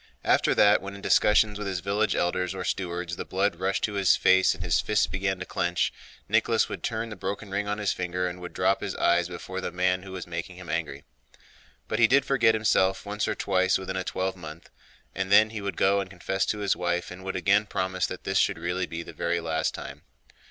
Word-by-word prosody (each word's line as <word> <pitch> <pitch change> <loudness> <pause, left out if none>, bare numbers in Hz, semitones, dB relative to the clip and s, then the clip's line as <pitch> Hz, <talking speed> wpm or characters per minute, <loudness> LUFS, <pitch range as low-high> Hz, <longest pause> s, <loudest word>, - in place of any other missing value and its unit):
After - - +3
that, 105 0 +5
when 100 0 -7
in 100 - -10
discussions 105 0 +3
with 105 - -4
his 95 -2 -2
village 100 +2 0
elders 90 +2 0
or - - -4
stewards 90 -2 -3
the - - -3
blood 95 -1 -1
rushed 95 +2 -1
to 105 - 0
his 100 -2 +4
face 95 +1 +4
and 95 - -7
his 85 -2 +2
fists 105 0 +2
began 95 0 -2
to 95 - -6
clench, 90 -2 -1 0.3
Nicholas - - +2
would - - -6
turn 115 0 -3
the 105 - -7
broken 100 +2 -5
ring 100 +1 -1
on 105 0 -1
his 105 -2 0
finger 90 0 -2
and 90 0 -6
would 90 - -7
drop - - +1
his - - -4
eyes 85 0 +2
before 95 +1 -6
the - - -4
man 90 +1 +1
who 95 0 -10
was 90 -2 -6
making 85 +1 -6
him 90 -1 -11
angry. 75 -4 -3 0.8
But 110 - -2
he 115 - +7
did 140 +3 +4
forget 120 -5 +3
himself 95 -3 +2
once 105 +1 -2
or - - -1
twice 95 -1 +2
within 95 0 -5
a 95 - -1
twelvemonth, 90 -4 -5 0.4
and 95 +1 -3
then 110 +1 +6
he 110 -2 -5
would 100 -3 -4
go 100 +1 +3
and 95 - -7
confess 95 +1 -2
to 105 - -1
his 100 - +2
wife, 85 0 -2
and 90 +1 -9
would 95 - -4
again 100 +3 +2
promise 95 -1 -1
that 90 - -7
this 95 0 +1
should - - +2
really 90 +2 -2
be 85 0 -5
the - - -11
very 85 0 -1
last 80 -1 -1
time. - - -8
95 Hz, 230 wpm, -26 LUFS, 90-100 Hz, 0.8 s, he